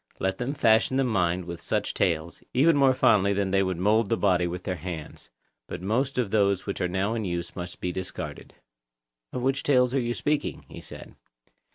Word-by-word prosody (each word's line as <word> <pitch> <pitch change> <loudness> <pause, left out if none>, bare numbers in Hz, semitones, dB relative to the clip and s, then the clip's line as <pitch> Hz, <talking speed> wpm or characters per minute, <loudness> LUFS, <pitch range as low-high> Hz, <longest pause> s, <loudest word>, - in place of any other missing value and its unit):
Let 95 0 -2
them 130 +4 -2
fashion 115 +1 +3
the 135 - +3
mind 90 -7 0
with 85 -1 -7
such - - -1
tales, 85 0 -1
even 155 +5 +5
more 135 -2 +4
fondly 100 -5 +4
than 100 -1 -1
they 95 0 +3
mould 95 +4 +1
the 115 - +1
body 90 -3 +2
with 90 +1 -5
their 90 -1 -3
hands; 85 -4 -8 0.4
but 90 - -6
most 125 +9 -1
of 120 -6 0
those 100 -3 +2
which 100 -1 -4
are 90 - +1
now 95 +4 0
in 115 -1 -2
use 85 -2 -4
must 90 -1 -7
be 90 - -2
discarded. 90 -4 -6 0.8
Of 125 - -4
what 135 +1 +1
tales 125 -3 +2
are 135 - +2
you 120 0 -2
speaking? 150 0 -2
he - - -10
said. - - -11
100 Hz, 200 wpm, -26 LUFS, 90-125 Hz, 0.8 s, even